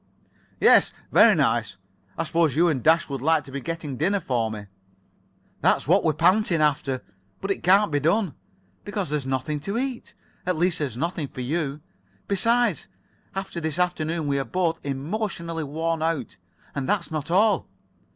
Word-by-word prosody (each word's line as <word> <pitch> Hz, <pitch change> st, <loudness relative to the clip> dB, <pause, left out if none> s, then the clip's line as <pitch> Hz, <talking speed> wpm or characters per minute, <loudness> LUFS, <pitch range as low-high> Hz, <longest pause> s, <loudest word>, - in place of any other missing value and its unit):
"Yes, -, -, +5 dB, 0.2 s
very -, -, +7 dB
nice. -, -, +1 dB, 0.4 s
I -, -, 0 dB
suppose 165 Hz, -4 st, +1 dB
you 170 Hz, +3 st, +4 dB
and 135 Hz, -6 st, -1 dB
Dash 165 Hz, +4 st, +4 dB
would 135 Hz, -3 st, -5 dB
like 160 Hz, +1 st, +2 dB
to 135 Hz, -, -12 dB
be 140 Hz, +1 st, -4 dB
getting 160 Hz, -3 st, -4 dB
dinner 195 Hz, +8 st, +1 dB
for 120 Hz, -9 st, -1 dB
me." 105 Hz, -2 st, -7 dB, 1.0 s
"That's -, -, +2 dB
what 185 Hz, +5 st, +4 dB
we're 160 Hz, -, +2 dB
panting 180 Hz, +1 st, +3 dB
after. 140 Hz, -3 st, 0 dB, 0.4 s
But 195 Hz, -, -2 dB
it -, -, -2 dB
can't 195 Hz, +1 st, +4 dB
be 145 Hz, -, +2 dB
done, 170 Hz, +4 st, +1 dB, 0.5 s
because 200 Hz, -6 st, -4 dB
there's 145 Hz, -3 st, -1 dB
nothing 135 Hz, +3 st, -2 dB
to 200 Hz, +9 st, -3 dB
eat. 260 Hz, -1 st, -4 dB, 0.3 s
At 180 Hz, -2 st, -1 dB
least, 175 Hz, +1 st, +1 dB
there's 135 Hz, -6 st, -3 dB
[Pg -, -, -5 dB
83]nothing 170 Hz, -5 st, -5 dB
for 130 Hz, -, -4 dB
you. 145 Hz, +2 st, -2 dB, 0.5 s
Besides, 230 Hz, -, +1 dB, 0.5 s
after 190 Hz, -3 st, -4 dB
this 160 Hz, 0 st, -3 dB
afternoon 170 Hz, -3 st, -1 dB
we 140 Hz, -1 st, 0 dB
are -, -, 0 dB
both 170 Hz, 0 st, -1 dB
emotionally 165 Hz, +3 st, -3 dB
worn 160 Hz, +3 st, -2 dB
out. 160 Hz, -11 st, -2 dB, 0.4 s
And 140 Hz, -2 st, -3 dB
that's 185 Hz, -5 st, 0 dB
not 155 Hz, -1 st, -3 dB
all. 210 Hz, +5 st, +3 dB
160 Hz, 170 wpm, -24 LUFS, 140-185 Hz, 1.0 s, very